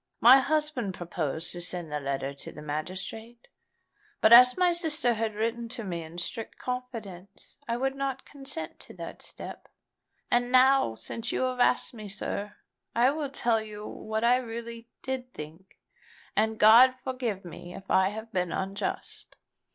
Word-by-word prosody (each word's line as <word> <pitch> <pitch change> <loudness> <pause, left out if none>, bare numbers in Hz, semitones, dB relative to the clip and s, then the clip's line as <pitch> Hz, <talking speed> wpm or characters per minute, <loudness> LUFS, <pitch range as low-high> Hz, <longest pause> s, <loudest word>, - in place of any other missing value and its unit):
My 255 +4 +9
husband 275 -8 -1
proposed 165 -3 -3
to 175 - -4
send 175 -2 -4
the 150 - -1
letter 135 0 -3
to 140 - -9
the 150 - -10
magistrate; 185 +10 -6 0.7
but 220 - +6
as 250 +1 +9
my 360 -1 +4
sister 320 -7 +2
had 220 -1 -2
written 230 +2 -2
to 240 -1 -5
me 175 -4 -4
in 160 +1 -10
strict 220 +6 -4
confidence, 220 -7 -7
I 235 0 -1
would 270 +2 0
not 270 -1 -3
consent 270 - -6
to - - -12
that 170 -2 -8
step. - - -9 0.6
And 245 0 +2
now, 260 - +5
since 230 - -5
you - - 0
have 255 -1 -1
asked 245 - +3
me, 215 -3 -8
sir, 205 +1 -4 0.4
I 245 +3 +5
will 295 -1 -3
tell 235 -4 +1
you 210 -1 -8
what 220 +1 -4
I 245 +1 +5
really 235 -1 -6 0.2
did 260 -1 -4
think; 160 +5 -10 0.6
and 220 +1 +1
God 240 +5 +8
forgive 245 -7 -3
me 175 +1 -9
if 195 - -9
I 190 0 +4
have 220 +2 -8
been 180 -2 -1
unjust." 195 +1 -4
225 Hz, 165 wpm, -28 LUFS, 185-250 Hz, 0.7 s, My